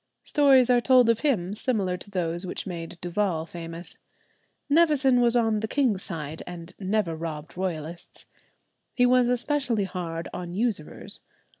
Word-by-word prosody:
Stories 270 Hz, -4 st, +5 dB
are 245 Hz, -1 st, +4 dB
told 250 Hz, -2 st, +5 dB
of 230 Hz, -, -1 dB
him 205 Hz, -, 0 dB
similar 210 Hz, -5 st, -1 dB
to 180 Hz, +3 st, -10 dB
those 175 Hz, -2 st, -1 dB
which 180 Hz, -, -4 dB
made 170 Hz, -2 st, -6 dB
Duval 175 Hz, -2 st, -1 dB
famous. 165 Hz, +1 st, -7 dB, 0.7 s
Nevison 285 Hz, -5 st, +4 dB
was 240 Hz, 0 st, +4 dB
on 225 Hz, -3 st, +2 dB
the 220 Hz, -, -2 dB
king's 235 Hz, -7 st, +1 dB
side, 160 Hz, -4 st, -4 dB
and 175 Hz, 0 st, -8 dB
never 195 Hz, -3 st, 0 dB
robbed 160 Hz, -1 st, -6 dB
Royalists. 170 Hz, -2 st, -5 dB, 0.7 s
He 245 Hz, -, +4 dB
was 250 Hz, -1 st, +4 dB
especially 250 Hz, -3 st, 0 dB
hard 170 Hz, -3 st, -4 dB
on 175 Hz, -1 st, -6 dB
usurers. 210 Hz, -8 st, -3 dB
195 Hz, 145 wpm, -26 LUFS, 170-245 Hz, 0.7 s, Stories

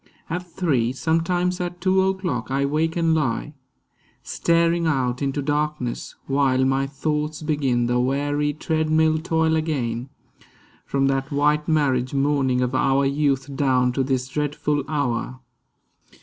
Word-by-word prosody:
At 180 Hz, 0 st, -4 dB
three, 140 Hz, -10 st, +1 dB
Sometimes 175 Hz, +5 st, 0 dB
at 175 Hz, 0 st, -4 dB
two 190 Hz, +1 st, +3 dB
o'clock, 190 Hz, -, -1 dB
I 135 Hz, +1 st, +1 dB
wake 155 Hz, +3 st, 0 dB
and 165 Hz, -1 st, +2 dB
lie, 145 Hz, -1 st, -1 dB, 0.7 s
Staring 170 Hz, 0 st, +1 dB
out 130 Hz, -5 st, 0 dB
into 140 Hz, 0 st, -1 dB
darkness; 150 Hz, -3 st, -2 dB
while 135 Hz, -1 st, +2 dB
my 135 Hz, +1 st, +1 dB
thoughts 150 Hz, +2 st, -3 dB
Begin 135 Hz, -6 st, +1 dB
the 120 Hz, +1 st, +1 dB
weary 145 Hz, +3 st, 0 dB
treadmill 155 Hz, 0 st, +1 dB
toil 160 Hz, 0 st, +1 dB
again, 130 Hz, -6 st, -2 dB, 0.8 s
From 135 Hz, 0 st, +1 dB
that 135 Hz, +1 st, -1 dB
white 150 Hz, +1 st, +1 dB
marriage 135 Hz, -5 st, +1 dB
morning 135 Hz, -2 st, +1 dB
of 125 Hz, 0 st, -1 dB
our 135 Hz, +1 st, +2 dB
youth 140 Hz, -1 st, 0 dB
Down 130 Hz, -3 st, +2 dB
to 135 Hz, -, -1 dB
this 130 Hz, -1 st, -1 dB
dreadful 145 Hz, +1 st, -1 dB
hour. 130 Hz, -4 st, -2 dB
145 Hz, 135 wpm, -23 LUFS, 130-160 Hz, 0.8 s, two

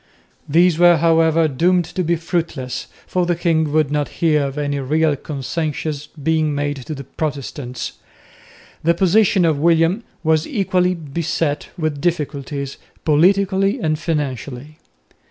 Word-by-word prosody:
These 170 Hz, +2 st, +4 dB
were, 175 Hz, -1 st, +7 dB
however, 165 Hz, 0 st, +3 dB
doomed 175 Hz, +5 st, +2 dB
to 180 Hz, +3 st, -3 dB
be 170 Hz, +1 st, +1 dB
fruitless, 160 Hz, -6 st, -3 dB, 0.2 s
for 180 Hz, -1 st, 0 dB
the 175 Hz, -, +1 dB
king 160 Hz, -3 st, +1 dB
would 155 Hz, -2 st, +2 dB
not 150 Hz, -1 st, 0 dB
hear 150 Hz, -4 st, +2 dB
of 135 Hz, +1 st, -7 dB
any 145 Hz, -1 st, -1 dB
real 150 Hz, +3 st, +1 dB
concessions 150 Hz, +1 st, -4 dB
being 155 Hz, 0 st, -1 dB
made 145 Hz, 0 st, -1 dB
to 155 Hz, -, -4 dB
the 140 Hz, -, -7 dB
Protestants. 140 Hz, -3 st, -5 dB, 0.9 s
The 170 Hz, +1 st, +3 dB
position 190 Hz, +1 st, +3 dB
of 155 Hz, -3 st, +1 dB
William 165 Hz, +6 st, +3 dB, 0.2 s
was 160 Hz, -1 st, +2 dB
equally 185 Hz, -5 st, +1 dB
beset 160 Hz, -1 st, -2 dB
with 155 Hz, -4 st, -2 dB
difficulties, 140 Hz, -4 st, -2 dB, 0.3 s
politically 195 Hz, -, +3 dB
and 155 Hz, -6 st, 0 dB
financially. 145 Hz, -2 st, -4 dB
160 Hz, 135 wpm, -19 LUFS, 145-170 Hz, 0.9 s, were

